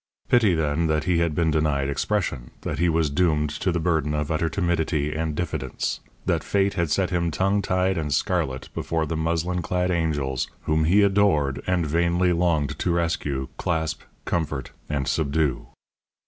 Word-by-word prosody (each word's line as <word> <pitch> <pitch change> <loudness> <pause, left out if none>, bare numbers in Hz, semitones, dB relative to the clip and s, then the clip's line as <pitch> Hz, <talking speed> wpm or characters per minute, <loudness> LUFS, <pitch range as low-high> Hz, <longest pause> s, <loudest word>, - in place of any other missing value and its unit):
Pity, 110 -7 +4
then, 80 +1 +1
that 80 -1 +1
he 90 -2 +2
had 85 -3 0
been 80 -1 +2
denied 75 -3 +1
expression, 70 -4 -1
that - - -4
he 85 +1 +3
was 80 -2 +1
doomed 75 -2 +2
to 90 +5 -1
the 85 - 0
burden 80 -3 0
of 75 +1 -2
utter 80 +1 +1
timidity 80 -4 0
and 80 -1 -2
diffidence, 70 -6 -3 0.3
that - - +1
Fate 100 0 +1
had 85 -2 0
set 95 +3 +1
him 85 -1 +1
tongue 95 +5 +1
tied 95 -1 +1
and 75 -2 -3
scarlet 65 -1 -1
before 80 -1 -1
the 80 - -3
muslin 85 +3 0
clad 90 +2 0
angels 75 -6 -1
whom 80 0 +1
he 100 +6 +5
adored 95 -9 +2
and 90 -2 +1
vainly 85 +3 +2
longed 85 -5 0
to 90 - 0
rescue, 75 -6 -1
clasp, 80 -2 -1 0.2
comfort, 75 -6 -2 0.2
and 70 -3 -1
subdue. 75 -3 0
80 Hz, 170 wpm, -24 LUFS, 75-90 Hz, 0.3 s, he